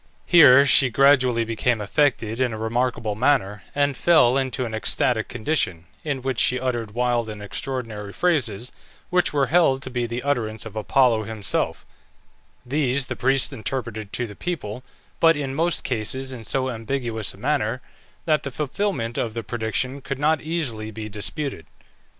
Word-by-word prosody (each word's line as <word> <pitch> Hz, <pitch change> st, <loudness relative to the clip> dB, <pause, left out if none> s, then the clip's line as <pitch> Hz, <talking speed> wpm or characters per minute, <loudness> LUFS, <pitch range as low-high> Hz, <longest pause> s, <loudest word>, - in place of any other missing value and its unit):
Here 140 Hz, -6 st, +8 dB
she 135 Hz, -1 st, +5 dB
gradually 130 Hz, -2 st, +4 dB
became 115 Hz, +1 st, 0 dB
affected 115 Hz, +1 st, 0 dB
in 125 Hz, -3 st, +1 dB
a -, -, -5 dB
remarkable 115 Hz, -1 st, -1 dB
manner, 105 Hz, -4 st, +1 dB
and 145 Hz, -1 st, +1 dB
fell 125 Hz, -3 st, +4 dB
into 130 Hz, -1 st, -1 dB
an 115 Hz, -, -6 dB
ecstatic 110 Hz, +1 st, 0 dB
condition, 110 Hz, -, -1 dB, 0.2 s
in 140 Hz, -4 st, -3 dB
which 130 Hz, -3 st, -1 dB
she 125 Hz, -, +3 dB
uttered 120 Hz, -4 st, -3 dB
wild 120 Hz, -2 st, 0 dB
and 105 Hz, -1 st, -7 dB
extraordinary 105 Hz, -1 st, -5 dB
phrases, 125 Hz, -, 0 dB, 0.4 s
which 180 Hz, -1 st, +2 dB
were 140 Hz, -2 st, +2 dB
held 135 Hz, -7 st, +4 dB
to 130 Hz, -, -7 dB
be 120 Hz, -1 st, -1 dB
the 120 Hz, +2 st, -4 dB
utterance 115 Hz, -7 st, -1 dB
of 110 Hz, -1 st, -9 dB
Apollo 115 Hz, 0 st, +2 dB
himself; 105 Hz, -2 st, -2 dB, 0.8 s
these 135 Hz, 0 st, 0 dB
the 130 Hz, -, -5 dB
priests 135 Hz, +4 st, +2 dB
interpreted 110 Hz, -3 st, -5 dB
to 125 Hz, -, -1 dB
the 105 Hz, -3 st, -10 dB
people, 130 Hz, -10 st, -5 dB, 0.4 s
but 165 Hz, -2 st, +5 dB
in 135 Hz, -2 st, -3 dB
most 165 Hz, +4 st, 0 dB
cases 130 Hz, +2 st, -2 dB
in 120 Hz, -3 st, -8 dB
so 130 Hz, +3 st, -1 dB
ambiguous 115 Hz, -2 st, -3 dB
a -, -, -18 dB
manner 125 Hz, -1 st, -1 dB, 0.5 s
that 155 Hz, -2 st, +2 dB
the 140 Hz, -, -5 dB
fulfilment 140 Hz, -, -2 dB
of 115 Hz, -1 st, -2 dB
the 115 Hz, -, -3 dB
prediction 120 Hz, +5 st, -2 dB
could 140 Hz, 0 st, -4 dB
not 150 Hz, +2 st, +2 dB
easily 140 Hz, -10 st, -3 dB
be 110 Hz, 0 st, -7 dB
disputed. 110 Hz, -, -4 dB
125 Hz, 160 wpm, -23 LUFS, 110-140 Hz, 0.8 s, Here